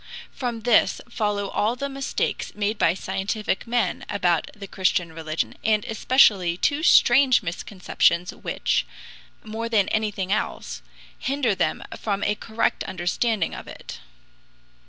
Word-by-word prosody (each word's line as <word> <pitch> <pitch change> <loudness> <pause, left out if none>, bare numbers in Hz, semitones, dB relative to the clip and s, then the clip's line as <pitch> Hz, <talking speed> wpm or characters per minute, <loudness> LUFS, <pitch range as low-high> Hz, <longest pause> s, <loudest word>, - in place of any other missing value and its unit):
From 240 -4 -4
this 235 0 +3
follow 205 -3 -1
all 220 +3 0
the 280 +3 -3
mistakes 275 0 -3
made 210 +1 -1
by 165 - +3
scientific 195 +3 -2
men 235 -5 0
about 175 -5 +1
the 200 - -7
Christian 180 -3 0
religion, 160 0 -3
and 215 -1 +2
especially 210 -7 +3
two 285 +10 +1
strange 260 -5 +5
misconceptions 180 0 0
which, - - -1 0.6
more 225 +1 -4
than 210 -4 +2
everything 205 -3 -1
else, - - -2 0.4
hinder 265 -5 0
them - - -1 0.2
from 200 -2 -2
a 210 - +2
correct 220 +2 -1
understanding 185 +2 -1
of - - -8
it. - - -9
210 Hz, 130 wpm, -24 LUFS, 190-230 Hz, 0.6 s, strange